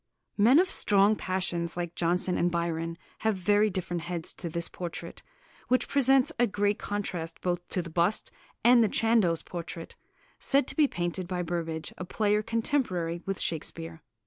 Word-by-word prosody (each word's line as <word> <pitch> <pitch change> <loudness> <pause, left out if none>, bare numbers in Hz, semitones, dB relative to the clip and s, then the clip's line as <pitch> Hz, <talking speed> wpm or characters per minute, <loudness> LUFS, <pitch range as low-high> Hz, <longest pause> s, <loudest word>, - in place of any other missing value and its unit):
Men 230 +7 +5
of 370 +2 +3
strong 205 +1 +3
passions 180 -3 -2
like 175 -1 -3
Jonson 175 +2 +1
and 175 - +2
Byron 165 -1 -2 0.2
have 220 -1 +1
very 205 +3 +3
different 175 -2 -3
heads 170 -1 -5
to 170 - -6
this 170 +1 -1
portrait, 175 -2 -7 0.5
which 255 +1 +2
presents 270 -1 +4
a 240 - +4
great 205 +1 0
contrast 180 -5 -4
both 175 -1 -2
to 180 - -2
the 170 - -8
bust 175 +5 +1 0.3
and 240 0 +7
the 215 - +2
Chandos 220 -8 +2
portrait" 170 -1 -7 0.4
(said 275 -1 +4
to - - -8
be 300 -2 +4
painted 175 -3 -3
by 180 -1 -2
Burbage, 165 -2 -4
a - - -3
player 210 +2 +1
contemporary 215 - -1
with 195 -1 -2
Shakespeare). 165 0 -3
180 Hz, 165 wpm, -28 LUFS, 170-215 Hz, 0.5 s, and